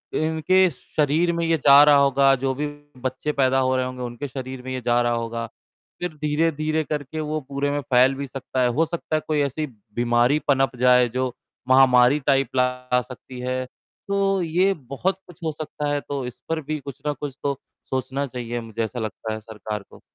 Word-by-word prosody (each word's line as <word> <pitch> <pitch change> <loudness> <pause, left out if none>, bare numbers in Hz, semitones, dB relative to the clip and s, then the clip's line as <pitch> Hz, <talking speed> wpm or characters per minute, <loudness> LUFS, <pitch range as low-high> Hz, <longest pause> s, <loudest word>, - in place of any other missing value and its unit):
इनके 160 +4 +3
शरीर 155 +4 0
में 170 0 -1
ये 165 0 +2
जा 140 +1 +9
रहा 150 -1 +6
होगा, 140 -1 +5
जो 135 +1 -1
भी 150 +2 -2 0.3
बच्चे 130 +3 -2
पैदा 135 -2 +2
हो 130 0 +2
रहे 130 0 +1
होंगे, 130 0 -6
उनके 120 +3 -5
शरीर 130 -1 -6
में 130 - -6
ये 130 - -3
जा 120 0 +3
रहा 120 0 +1
होगा, 115 0 -3 0.5
फिर 180 -2 -3
धीरे-धीरे 155 +1 +1
करके 150 +1 -4
वो 155 0 -2
पूरे 140 +1 -2
में 145 - 0
फैल 130 +1 +4
भी 140 0 -5
सकता 130 0 -3
है, 125 - +4
हो 150 +7 +2
सकता 160 -1 -3
है 155 - +1
कोई 155 -1 +1
ऐसी 145 +2 -1 0.3
बीमारी 120 +4 +3
पनप 135 -2 +2
जाए 125 -1 +5
जो 130 +1 -1 0.4
महामारी 130 +1 +6
टाइप 135 -1 +3
ला 125 0 +1
सकती 125 0 -11
है, 130 0 -2 0.4
तो 195 -1 +1
ये 180 +4 +2
बहुत 155 +7 -3
कुछ 175 +1 -15
हो 160 - 0
सकता 150 -1 -4
है, 145 - +1
तो 140 -3 -4
इस 125 - -8
पर 160 -1 -1
भी 155 +1 -3
कुछ 140 -2 -9
ना 150 - +1
कुछ 145 -2 -6
तो 140 -2 0 0.3
सोचना 130 +2 -2
चाहिए, 120 -1 -4
मुझे 115 0 -4
ऐसा 120 +2 -4
लगता 110 0 -4
है 110 - -4
सरकार 105 -1 -6
को। - - -16
135 Hz, 205 wpm, -23 LUFS, 125-150 Hz, 0.5 s, जा